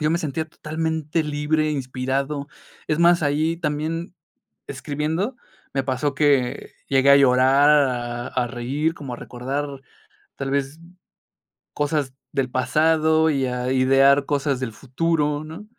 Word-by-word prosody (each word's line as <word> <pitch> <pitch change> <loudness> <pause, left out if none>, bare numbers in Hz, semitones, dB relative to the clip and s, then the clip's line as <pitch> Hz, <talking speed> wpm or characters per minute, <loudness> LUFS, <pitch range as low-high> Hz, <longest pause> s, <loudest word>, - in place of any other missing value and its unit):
yo 150 - +1
me 170 - +1
sentía 160 0 -3
totalmente 160 0 -2
libre, 150 +1 0
inspirado. 135 +1 -2 0.4
Es 155 - 0
más, 170 0 +5
ahí 155 +3 +1
también 160 +2 -3 0.5
escribiendo 160 - -3 0.4
me 135 - +1
pasó 140 +2 -1
que 140 -3 +1 0.2
llegué 135 0 +4
a 140 - +9
llorar, 135 +2 +5
a 125 -4 +1
a 125 -1 -1
reír, 135 +6 -2
como 135 -6 -7
a - - -8
recordar, 130 +5 -4 0.7
tal 135 -1 -3
vez, 140 +2 -2 0.9
cosas 145 -2 -1 0.2
del 130 -2 0
pasado 160 +4 +2
y 135 -2 0
a 125 0 -2
idear 135 +2 +4
cosas 140 -2 0
del 115 -4 -3
futuro, 150 +3 -1
¿no? 160 +7 -9
145 Hz, 135 wpm, -22 LUFS, 130-155 Hz, 0.9 s, a